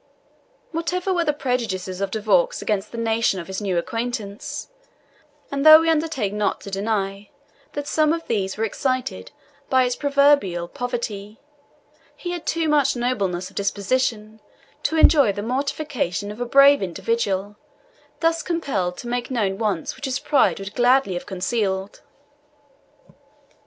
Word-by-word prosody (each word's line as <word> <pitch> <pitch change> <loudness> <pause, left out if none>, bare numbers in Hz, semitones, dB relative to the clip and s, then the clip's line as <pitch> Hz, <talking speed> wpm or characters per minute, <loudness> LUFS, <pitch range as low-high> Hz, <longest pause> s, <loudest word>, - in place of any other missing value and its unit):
Whatever 355 +3 -1
were 345 -2 +1
the 300 - +3
prejudices 220 -10 -3
of 195 - 0
De 220 - -3
Vaux 200 -5 +2
against 210 -1 -2
the 235 - -7
nation 225 -3 +1
of 170 - -6
his 190 +3 -5
new 190 -4 -1
acquaintance, 225 +1 -4 0.8
and 280 0 -1
though 310 0 +10
we 325 0 +2
undertake 300 -10 -1
not 210 -1 0
to 200 - -9
deny 195 0 -2 0.4
that 290 0 -4
some 310 +1 +2
of 330 0 -2
these 195 -4 -2
were 220 - -1
excited 255 +4 -2 0.4
by 260 -1 +4
its 250 -1 0
proverbial 280 -12 +2
poverty, 225 -2 -5 0.8
he 350 - -5
had 350 -2 -6
too 330 -1 0
much 290 -3 +3
nobleness 200 -8 -1
of - - -24
disposition 215 +1 -1 0.4
to 320 - 0
enjoy 285 -8 +6
the 205 +1 -5
mortification 255 - -2
of 215 +3 -9
a - - 0
brave 275 +1 +6
individual 200 +1 -1 0.7
thus 330 0 +2
compelled 265 - -2
to 240 - -8
make 245 0 -2
known 205 -6 -1
wants 205 -7 -1
which 265 - -7
his 265 -1 -1
pride 290 -1 +2
would 195 +1 -7
gladly 245 -4 +3
have 175 - -5
concealed. 190 0 -2
230 Hz, 150 wpm, -22 LUFS, 200-280 Hz, 0.8 s, though